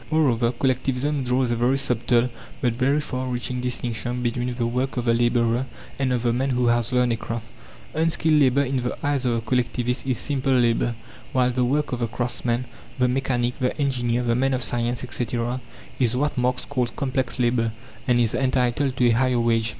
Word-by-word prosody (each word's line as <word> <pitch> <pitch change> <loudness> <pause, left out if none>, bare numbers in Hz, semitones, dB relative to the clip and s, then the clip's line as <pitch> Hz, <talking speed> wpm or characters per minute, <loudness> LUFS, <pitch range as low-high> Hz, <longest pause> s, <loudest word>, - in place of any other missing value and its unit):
Moreover, 130 -7 +2
Collectivism 130 +3 0
draws 125 0 +1
a - - +1
very 120 +3 +2
subtle 120 -2 +2 0.3
but 125 -5 +1
very 135 +5 +2
far 130 -3 -3
reaching 125 0 -2
distinction 125 0 -2
between 120 +1 -1
the 120 -1 -1
work 125 +3 -1
of 120 - -1
the 115 - +3
labourer 120 +1 +2 0.3
and 130 -2 +1
of 125 -2 0
the 120 -1 +2
man 130 +3 0
who 125 -1 +1
has 120 0 +2
learned 125 -1 +2
a - - -2
craft. 115 0 -5 0.5
Unskilled 160 -1 +2
labour 135 +1 +4
in 135 0 -1
the 125 -1 -2
eyes 140 -3 +1
of 120 - +2
the 115 - -1
collectivist 125 +2 -1
is 130 -3 +1
simple 135 -1 0
labour, 120 -1 +2 0.4
while 125 -1 +3
the 125 0 0
work 145 +4 0
of 125 - -2
the 120 - 0
craftsman, 120 +1 -1 0.3
the 125 -1 +3
mechanic, 125 -1 -1
the 125 0 -1
engineer, 125 -4 0
the 120 -1 +1
man 135 +2 +1
of 125 - -1
science, 120 0 -1
etc., 120 0 -2 0.4
is 125 -1 +2
what 145 +2 0
Marx 125 0 0
calls 125 -4 -1
complex 130 -3 -2
labour, 120 -2 +1 0.4
and 125 -2 +4
is 115 -2 +2
entitled 130 +1 +1
to 125 - +3
a 120 - +5
higher 125 +1 +2
wage. 115 -1 +2
125 Hz, 195 wpm, -24 LUFS, 120-130 Hz, 0.5 s, a